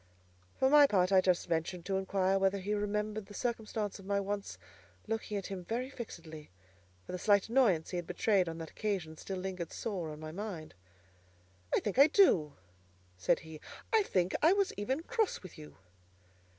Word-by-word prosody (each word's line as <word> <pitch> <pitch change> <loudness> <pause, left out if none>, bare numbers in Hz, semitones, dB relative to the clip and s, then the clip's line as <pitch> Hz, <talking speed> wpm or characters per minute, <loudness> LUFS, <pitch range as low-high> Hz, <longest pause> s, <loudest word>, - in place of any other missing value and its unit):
For 265 - +3
my 290 +1 +7
part, 185 -5 +2
I 190 -1 +6
just 185 -2 +2
ventured 170 +1 -2
to 195 -1 0
inquire 190 0 +1
whether 195 +1 +2
he 200 +2 -2
remembered 210 0 -2
the 205 - -11
circumstance 220 -4 -3
of 195 - -12
my 200 0 +1
once 200 0 -4 0.5
looking 220 -1 -3
at 195 - -4
him 190 -2 -5
very 245 +8 -3
fixedly; 160 - -9 0.6
for - - -8
the 180 - -4
slight 205 0 +3
annoyance 225 -10 +3
he 180 - -2
had 175 - -4
betrayed 195 -6 +2
on 165 - -6
that 165 -1 -7
occasion 190 -7 -3
still 190 +4 -6
lingered 185 -2 -4
sore 185 -8 -4
on 150 0 -8
my 155 0 -7
mind. 180 - -6 1.0
"I - - +2
think 210 +4 -2
I 280 - +9
do!" 185 - +4 0.6
said 90 - +1
he: 160 -1 -11 0.3
"I 445 - +6
think 185 - 0
I 325 +4 +6
was 395 -1 +1
even 260 +10 -2
cross 445 - -1
with 185 - -10
you." 150 -1 -12
195 Hz, 185 wpm, -32 LUFS, 175-220 Hz, 1.0 s, I